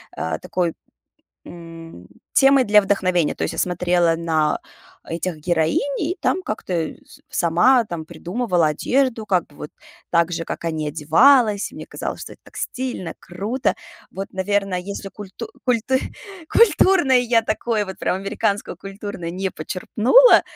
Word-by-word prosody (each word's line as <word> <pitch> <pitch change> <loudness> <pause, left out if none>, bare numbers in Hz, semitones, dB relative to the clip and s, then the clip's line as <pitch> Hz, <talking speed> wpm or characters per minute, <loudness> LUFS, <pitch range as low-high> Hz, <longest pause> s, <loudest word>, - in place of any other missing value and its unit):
а, 80 -1 -2
такой, 175 -3 -2 0.7
м, 165 - -11 0.3
темой 270 -1 +5
для 210 -1 +5
вдохновения. 185 -5 +1
То - - -6
есть - - -3
я - - -8
смотрела 175 -1 +2
на 160 -2 0 0.5
этих 170 0 -3
героинь, 160 0 +1 0.2
и 330 +4 -1
там 370 - 0
как-то, 215 - -5
э, 165 -2 -2
с 290 - -17
сама 205 +10 +3
там 170 -4 -5
придумывала 175 +2 -1
одежду, 235 - 0
как 185 -4 +1
бы 145 - -21
вот 150 - -8 0.4
так 170 0 +2
же, 165 -1 -3
как - - -6
они, 155 -2 -2
одевалась. 205 - +4
И - - -14
мне - - -8
казалось, - - -5
что - - -8
это - - -27
так - - -16
стильно, 250 -8 -4
круто. 210 +9 -2 0.4
Вот, 195 +1 -6
наверное, 195 0 0
если 195 +2 -6
культу 205 +3 -9 0.2
культу 250 0 +1 0.6
культурное, 370 - +5
я 240 -1 +3
такое 215 -1 -1
вот 190 - -8
прям - - 0
американское 200 +1 -2
культурное 195 -3 -7
не 190 +2 -3
почерпнула, 220 - +4
190 Hz, 150 wpm, -21 LUFS, 170-230 Hz, 0.7 s, темой